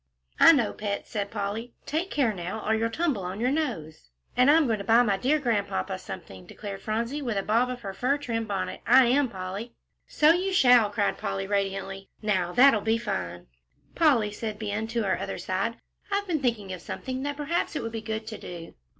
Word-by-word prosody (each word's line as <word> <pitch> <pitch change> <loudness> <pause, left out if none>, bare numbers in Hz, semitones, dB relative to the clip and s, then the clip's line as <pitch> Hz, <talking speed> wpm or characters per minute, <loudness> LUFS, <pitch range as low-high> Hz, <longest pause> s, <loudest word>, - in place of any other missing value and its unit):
"I - - +10
know, 245 -9 +2
pet," 205 -1 -3
said 205 -2 -3
Polly; 215 +3 -4
"take 330 +5 -2
care, 255 - +1
now, 185 +4 -5
or 220 - +3
you'll 225 +1 +1
tumble 290 - -1
on 185 +2 -5
your 250 +3 +1
nose." 180 - -3 0.3
"And 250 +2 +5
I'm 310 +1 +6
going 225 -4 0
to - - -4
buy 230 +3 +5
my 205 -4 +2
dear 265 +9 +2
Grandpapa 210 - -1
something," 95 -1 -9
declared 200 -2 -7
Phronsie, 230 +7 -2
with 235 -6 -2
a 195 - 0
bob 230 +5 +2
of 250 -1 -5
her 195 -1 -5
fur 265 +7 +1
trimmed 230 -5 -3
bonnet; 200 -2 -3
"I 255 +2 +7
am, 260 +2 +3
Polly." 195 +4 -6 0.3
"So 305 +1 +5
you 375 +2 -1
shall," 245 - +6
cried 205 -1 -1
Polly, 195 0 -2
radiantly; 195 -1 -2
"now 190 -5 0
that'll 245 0 +6
be 220 +2 +1
fine." 140 - -4 0.5
"Polly," 260 -11 +3
said 215 0 -5
Ben, 215 0 -3
on 230 -1 0
her 195 - 0
other - - -4
side, 195 +5 -2 0.4
"I've 400 0 0
been 330 -6 -1
thinking 220 -7 -1
of 180 - -7
something 260 +6 -5
that 285 +1 -3
perhaps 310 +3 -1
it 295 - -2
would 225 - -4
be 225 0 -4
good 220 0 -4
to 220 -1 -7
do." 170 -2 -9
225 Hz, 210 wpm, -27 LUFS, 200-255 Hz, 0.5 s, I